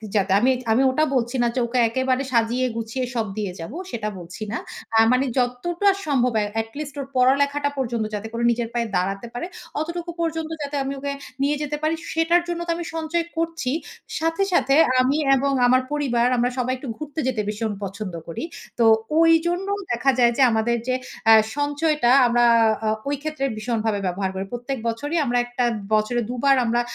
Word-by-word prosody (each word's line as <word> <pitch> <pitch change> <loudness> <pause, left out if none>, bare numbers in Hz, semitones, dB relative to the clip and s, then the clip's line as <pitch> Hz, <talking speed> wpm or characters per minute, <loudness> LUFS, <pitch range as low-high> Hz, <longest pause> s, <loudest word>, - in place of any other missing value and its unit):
যাতে 195 -1 +2
আমি 255 +4 +4 0.2
আমি 240 +4 +4
ওটা 310 +4 +1
বলছি 240 +1 0
না - - +3
যে - - +1
ওকে 250 +1 0
একেবারে 260 +2 0
সাজিয়ে 240 +2 +2
গুছিয়ে 230 +3 -3
সব 225 - 0
দিয়ে 205 -3 -2
যাব। 165 +7 -6 0.2
সেটা 215 -2 -3
বলছি 175 +5 -8
না। 235 - -1 0.4
আ - - +5
মানে 255 +2 +3
যতটা 335 +11 +1 0.2
সম্ভব 250 -5 +1
এ্যা 205 -1 -1
এট 225 - -9
লিস্ট 295 -1 -6
ওর 275 - -3
পড়া-লেখাটা 280 +3 +3
পর্যন্ত 235 -4 -1
যাতে 210 +2 -5
করে 235 - -2
নিজের 235 -1 -2
পায়ে 235 -1 -1
দাঁড়াতে 195 +5 -1
পারে। 245 - -4 0.3
অতটুকু 340 +2 -4
পর্যন্ত 325 -1 -2
যাতে 290 0 -4
আমি 275 - -3
ওকে 280 0 -3 0.3
নিয়ে 285 +2 +2
যেতে 295 0 -2
পারি 315 +1 +1 0.2
সেটার 325 +2 +3
জন্য 345 -1 -3
তো - - +1
আমি 345 - -5
সঞ্চয় 325 +1 -1
করছি। 330 -5 -1 0.5
সাথে, 330 +4 +1
সাথে 275 -5 +3 0.3
আমি 270 +4 +2 0.2
এবং 275 +1 +1 0.2
আমার 255 +1 +4
পরিবার 250 -5 +1
আমরা 245 +1 +2
সবাই 255 0 0
একটু 265 - -9
ঘুরতে 305 0 -6
যেতে 235 -5 0
ভীষণ 215 +1 -2
পছন্দ 195 -1 -5
করি। 165 - -5 0.4
তো 230 - +5 0.3
ওই 330 0 +6 0.2
জন্য 355 +3 -1 0.2
দেখা 255 +3 +2
যায় 235 -1 +5
যে, - - +2
আমাদের 230 +2 +1
যে 255 - +1 0.4
আ - - +10 0.2
সঞ্চয়টা 290 -2 +1 0.2
আমরা 240 0 +3 0.4
আ - - +1 0.2
ওই 285 - 0
ক্ষেত্রে 310 -3 -2
ভীষণভাবে 220 -2 -1
ব্যবহার 190 +1 -1
করি। 190 +1 -3
প্রত্যেক 245 +3 -3
বছরই 290 +8 -2
আমরা 245 -1 +1
একটা 245 0 -2 0.3
বছরে 215 +3 +2
দুবার 270 +3 +3
আমরা 235 +1 +2
255 Hz, 190 wpm, -23 LUFS, 230-295 Hz, 0.5 s, আ